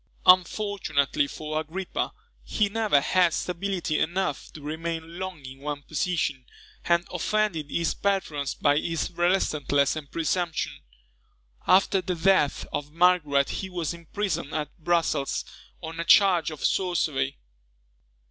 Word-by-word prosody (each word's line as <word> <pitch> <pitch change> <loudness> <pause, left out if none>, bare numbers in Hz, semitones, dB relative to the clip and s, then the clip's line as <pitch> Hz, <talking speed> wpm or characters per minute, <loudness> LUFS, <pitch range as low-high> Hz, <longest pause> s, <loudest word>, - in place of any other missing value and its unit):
Unfortunately 180 -6 +3
for 155 +2 -4
Agrippa, 175 +4 -3 0.3
he 210 -2 0
never 215 -7 +2
had 180 +1 +3
stability 180 -3 -2
enough 175 -3 -1
to - - -9
remain 165 +2 -5
long 185 -7 -6
in 130 +1 -9
one 145 0 -5
position, 155 -3 -1 0.4
and 170 0 +2
offended 210 -9 0
his 170 +1 0
patrons 155 -9 -1
by 145 0 +3
his 165 +1 -2
restlessness 155 -6 +1
and 150 -3 -7
presumption. 165 0 -1 0.9
After 190 +1 +4
the 180 0 -2
death 170 -4 +2
of 145 0 -3
Margaret 160 -5 +3
he 190 - -4
was 175 -4 -3
imprisoned 170 -2 -3
at 150 -1 -3
Brussels, 165 -4 0 0.4
on 165 +1 -6
a - - 0
charge 175 -2 +5
of 155 -3 -5
sorcery. 155 -7 0
165 Hz, 125 wpm, -26 LUFS, 150-185 Hz, 0.9 s, charge